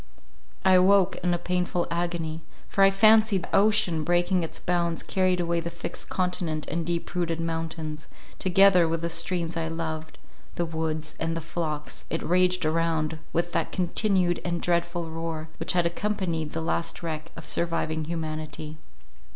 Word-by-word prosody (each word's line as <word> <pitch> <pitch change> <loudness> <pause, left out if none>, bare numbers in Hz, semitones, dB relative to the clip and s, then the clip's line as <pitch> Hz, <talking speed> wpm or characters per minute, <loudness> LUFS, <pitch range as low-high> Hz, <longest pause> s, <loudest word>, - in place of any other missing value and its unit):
I 190 - +6
awoke 190 +1 +5
in 180 - 0
a 175 - +2
painful 180 0 -1
agony—for 170 +2 -2
I 195 - +8
fancied 215 -1 +5
that - - -9
ocean, 200 -6 +3
breaking 175 +2 +2
its 165 - -5
bounds, 170 -1 0
carried 185 -1 +1
away 170 -1 0
the 170 0 -4
fixed 170 -1 -6
continent 180 -4 -1
and 165 +3 -1
deep 170 0 -3
rooted 170 -2 -1
mountains, 160 -2 -4 0.3
together 185 -1 +5
with 165 0 -1
the 170 - -1
streams 170 0 0
I 165 -1 -1
loved, 160 -1 -4 0.4
the 175 - 0
woods, 160 -1 -3
and 165 0 -1
the - - -1
flocks—it 160 0 -4
raged 180 0 +2
around, 160 -1 0
with 170 +1 0
that - - -1
continued 185 -1 +1
and 170 -1 -1
dreadful 170 -1 -1
roar 160 -1 -4
which - - +1
had 175 -1 +2
accompanied 170 -4 -2
the 160 - -2
last 170 +1 -2
wreck 160 0 -4
of 165 - -10
surviving 160 -2 -1
humanity. 155 -1 -5
170 Hz, 155 wpm, -26 LUFS, 160-180 Hz, 0.4 s, I